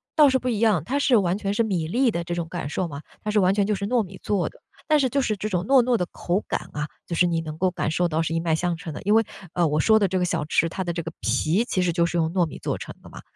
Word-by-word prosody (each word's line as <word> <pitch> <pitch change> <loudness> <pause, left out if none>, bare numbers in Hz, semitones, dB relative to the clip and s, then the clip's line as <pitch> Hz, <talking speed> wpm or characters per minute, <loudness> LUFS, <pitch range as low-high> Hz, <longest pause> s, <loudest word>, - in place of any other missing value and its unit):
倒 300 -2 +7
是 260 0 +2
不 255 - -5
一 230 -4 0
样， 210 -9 +3
它 270 +9 -1
是 270 -4 +4
完 185 -2 +1
全 200 -1 -2
是 210 - +1
米 180 -7 -1
粒 245 +9 +2
的 170 -6 -2
这 175 - -4
种 170 -1 -3
感 170 -4 -4
受 180 +4 -2
嘛， 140 -2 -7 0.2
它 215 - -4
是 210 - +3
完 185 0 +4
全 205 -1 +2
就 210 +1 0
是 200 +1 -3
糯 240 +3 +2
米 190 -2 -8
做 200 -4 0
的。 - - -21 0.3
但 305 -1 +4
是 265 -2 +2
就 275 +3 +1
是 215 -4 0
这 215 - -3
种 180 -3 -1
糯 265 +6 +5
糯 245 0 +2
的 180 - -1
口 180 +4 -1
感 - - -3
啊， 150 +1 -3 0.2
就 170 - -4
是 180 - +4
你 165 -1 0
能 155 -1 -7
够 185 +2 +2
感 165 - -2
受 175 +2 +1
到 160 -1 0
是 160 0 -2
一 165 - +1
脉 165 -1 +1
相 175 +1 -1
承 165 -1 -7
的。 - - -7
因 205 - +2
为， 225 +1 +5 0.3
呃， 175 -2 +2
我 150 0 0
说 220 +7 +5
的 200 - +3
这 185 0 -1
个 180 - +1
小 170 - -1
吃， 165 +2 +1
它 190 - -3
的 175 -1 -3
这 170 -1 -3
个 165 - -5
皮 155 - +1
其 185 - -1
实 180 -1 +1
就 170 0 +2
是 170 +1 -2
用 160 -1 +1
糯 180 -2 +3
米 160 - -8
做 - - -2
成 - - -8
的 - - -13
嘛。 - - -11
180 Hz, 360 characters per minute, -24 LUFS, 165-215 Hz, 0.3 s, 倒